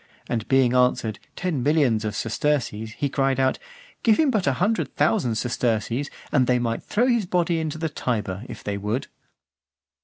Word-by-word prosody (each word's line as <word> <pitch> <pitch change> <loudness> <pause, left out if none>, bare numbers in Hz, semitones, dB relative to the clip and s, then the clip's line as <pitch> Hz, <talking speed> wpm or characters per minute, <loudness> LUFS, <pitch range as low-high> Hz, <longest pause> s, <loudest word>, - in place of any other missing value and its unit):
And 115 -2 -2
being 130 -2 +4
answered 125 -4 +2 0.2
"ten 175 -8 -2
millions 135 -6 +2
of 105 -1 -3
sesterces," 110 -2 -1
he 145 - -1
cried 135 -1 0
out, 130 0 +2 0.4
"give 220 -2 +4
him 305 -4 +4
but 210 - 0
a 135 - +3
hundred 205 - 0
thousand 125 - +2
sesterces, 120 +2 -1 0.2
and 130 -4 +3
they 125 - +3
might 115 -1 -1
throw 230 +4 +1
his 235 -6 +2
body 175 -2 +1
into 155 -1 -3
the 160 +1 -1
Tiber, 110 -9 -3
if 110 - -8
they 100 -1 -3
would." 105 +6 -2
130 Hz, 175 wpm, -24 LUFS, 115-160 Hz, 0.4 s, being